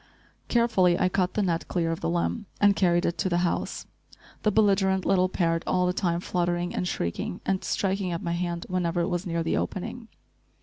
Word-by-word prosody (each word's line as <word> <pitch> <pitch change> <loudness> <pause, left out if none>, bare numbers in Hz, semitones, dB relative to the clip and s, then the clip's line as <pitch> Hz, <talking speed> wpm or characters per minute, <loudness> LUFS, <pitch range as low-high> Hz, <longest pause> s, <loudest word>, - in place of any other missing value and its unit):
Carefully 195 -7 +3
I 185 - +3
cut 185 -1 0
the 210 - +2
net 170 -3 -1
clear 165 -2 0
of 165 - -3
the - - -1
limb 175 +5 -1
and 205 -1 +5
carried 175 -3 +2
it 170 - -1
to 190 - +1
the 175 - +1
house, 170 - -2 0.6
the 215 - +2
belligerent 195 -2 +3
little 185 -1 +3
parrot 165 -3 0
all 180 0 +2
the 180 - +1
time 175 -2 0
fluttering 175 -1 -1
and 180 - -1
shrieking, 85 - -3
and 190 -1 0
striking 195 -1 -1
at 170 - -3
my 170 - -2
hand 170 -1 -2
whenever 175 -1 0
it 170 - 0
was 175 +1 -2
near 165 -1 -1
the 165 - 0
opening. 225 +5 -4
180 Hz, 205 wpm, -26 LUFS, 170-190 Hz, 0.6 s, and